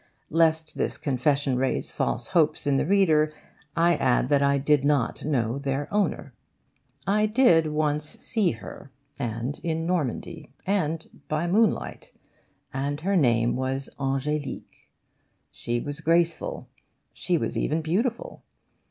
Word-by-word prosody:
Lest 160 0 +2
this - - -1
confession 140 0 0
raise 130 +1 -1
false 120 - -2
hopes 160 -6 +2
in 140 -1 +2
the 140 - 0
reader, 160 -6 +4 0.5
I 170 +1 +4
add 125 -1 +2
that 145 -1 +3
I 140 0 +3
did 140 0 +2
not 145 -3 +1
know 130 -4 0
their 140 +1 -2
owner. 190 -9 0 0.7
I 210 +3 +2
did 210 -9 +4
once 150 0 -1
see 215 -7 0
her, 115 +4 -10 0.3
and 120 +2 -3
in 165 -1 -1
Normandy, 165 -2 -2 0.2
and 165 -5 0 0.2
by 155 +2 -1
moonlight, 210 +5 0 0.6
and 140 +3 -2
her 195 +4 0
name 120 -7 +3
was 130 +1 -2
Ange'lique. 140 +2 -3 0.6
She 120 0 -3
was 145 +5 -6
graceful, 170 - 0 0.5
she 180 -2 0
was - - -2
even 160 +2 0
beautiful. 225 +9 -1
150 Hz, 130 wpm, -26 LUFS, 135-170 Hz, 0.7 s, reader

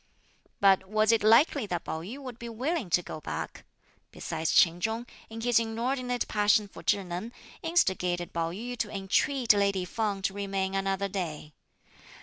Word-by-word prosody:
But 190 -1 +4
was 215 +1 +3
it 230 - +3
likely 230 +2 +5
that 175 -3 -3
Pao 160 - -4
yü 210 +11 -7
would 255 -4 -9
be 235 - -6
willing 255 - -2
to 180 +1 +2
go 155 - -7
back? - - -6 0.5
Besides 160 0 -3
Ch'in 170 0 +4
Chung, 225 +3 -1 0.2
in 225 0 -7
his 240 0 +4
inordinate 245 +2 -2
passion 210 0 +3
for - - -12
Chih 200 - +1
Neng, 180 +6 -5 0.3
instigated 180 - 0
Pao 165 -1 -1
yü 235 +8 -5
to 210 - -1
entreat 215 +5 +2
lady 200 -2 +1
Feng 200 0 -2
to 195 - 0
remain 195 -1 -2
another 195 0 0
day. 165 -6 -5
205 Hz, 165 wpm, -28 LUFS, 190-230 Hz, 0.5 s, likely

